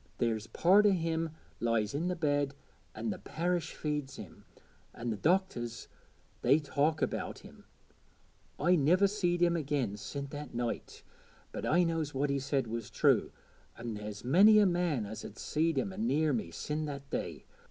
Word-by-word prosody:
There's 115 -2 -1
part 200 +4 +5
o' 200 - +5
him 165 -2 -1 0.3
lies 115 -2 0
i' 145 - -1
the 180 +2 -1
bed, 145 -4 0 0.4
an' 110 0 -2
the - - -5
parish 175 +1 -2
feeds 150 -3 -3
him, 100 -6 -11 0.5
an' 120 0 -3
the - - -1
doctors 120 - 0 0.5
they 135 +4 +5
talk 150 +1 0
about - - -2
him. - - -15 0.9
I 180 +1 +4
niver 175 +6 +4
seed 175 -4 +1
him 170 0 +3
again 140 -9 -1
sin' 140 +7 -5
that 145 -3 -7
night, 120 -1 -4 0.5
but - - -4
I 175 +4 +4
knows 165 -4 -1
what 140 +1 +1
he 140 - 0
said 135 0 0
was 115 -1 -5
true, - - +3 0.5
an' 120 -1 -5
there's 105 0 -7
many 195 - +7
a 210 - +6
man 175 - +1
as 110 +2 -7
'as 105 - -9
seed 160 0 0
him 190 +8 -1
anear 160 -8 +1
me 110 -8 -2
sin' 150 - -3
that 140 -2 -6
day. - - -4
145 Hz, 170 wpm, -32 LUFS, 120-170 Hz, 0.9 s, many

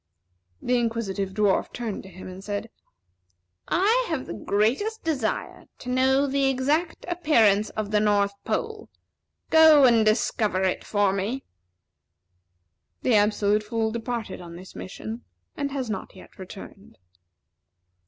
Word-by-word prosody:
The 250 0 +2
Inquisitive 205 -5 -2
Dwarf 205 -2 +1
turned 230 -4 -4
to 190 - -13
him, 185 0 -11
and 185 +1 -9
said: 205 +2 -4 1.0
"I 440 +8 +3
have - - -3
a - - -5
great 215 - +1 0.2
desire 270 -9 -2
to 250 - -8
know 265 +2 +3
the 275 0 +1
exact 290 +6 0
appearance 230 - +3
of 215 -1 -3
the 210 - +3
North 205 -1 +2
Pole. - - -3 0.6
Go 315 -3 +8
and 230 -3 +5
discover 215 -2 +1
it 185 - 0
for 205 -2 +1
me." 210 +8 -2 1.6
The 250 - +2
Absolute 210 0 +3
Fool 220 +1 -2
departed 230 -4 -4
on 170 -1 -10
this 185 +2 -12
mission, 220 +5 -7 0.3
and 280 -1 -2
has 270 -3 -3
not 205 -3 -5
yet 185 - -16
returned. 190 +1 -11
220 Hz, 135 wpm, -25 LUFS, 200-260 Hz, 1.6 s, Go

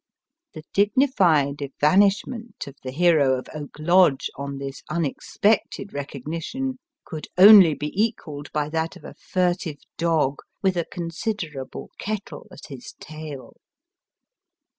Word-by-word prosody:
The 155 - -8
dignified 195 - +3
evanish 185 +9 +3
ment 230 -4 -8
of 140 - -11
the 130 - -6
hero 145 -3 +3
of 130 - -7
Oak 150 -2 -8
Lodge, 170 -2 +3
on 140 0 -5
this 135 -1 -7
unexpected 195 +6 -1
recognition, 165 - -5 0.3
could 155 -2 -7
only 190 -5 +9
bo 145 - -5
equalled 180 -9 -3
by 150 -1 -1
that 160 +1 -2
of - - -14
a - - -9
furtive 180 -4 -1 0.2
dog 160 -5 +1 0.2
with 190 -1 +2
a 170 -2 -1
considerable 165 - -5
kettle 210 0 -5
at 185 - -12
his 135 -4 -10
tail. 155 -3 -9
165 Hz, 125 wpm, -23 LUFS, 145-195 Hz, 0.3 s, only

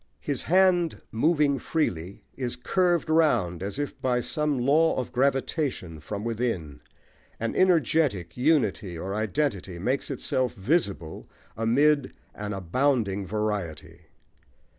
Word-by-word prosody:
His 145 -3 -2
hand 180 -2 +3
moving 145 +2 +2
freely 95 - -2
is 125 -2 -3
curved 175 +6 +1
round 120 - +2
as 100 +6 -4
if 145 -1 -4
by 125 -1 +1
some 150 +3 0
law 150 +6 +3
of 130 -2 -3
gravitation 135 - -1
from 100 +7 -6
within: 110 - -3 0.6
an 115 0 -2
energetic 155 - +2
unity 120 - +1
or 95 +4 -4
identity 110 - -1
makes 125 +10 -1
itself 130 -2 -1
visible 100 - -1 0.3
amid 135 +5 +2 0.2
an 105 0 -5
abounding 100 0 0
variety. 105 -6 -4
125 Hz, 115 wpm, -26 LUFS, 100-150 Hz, 0.6 s, hand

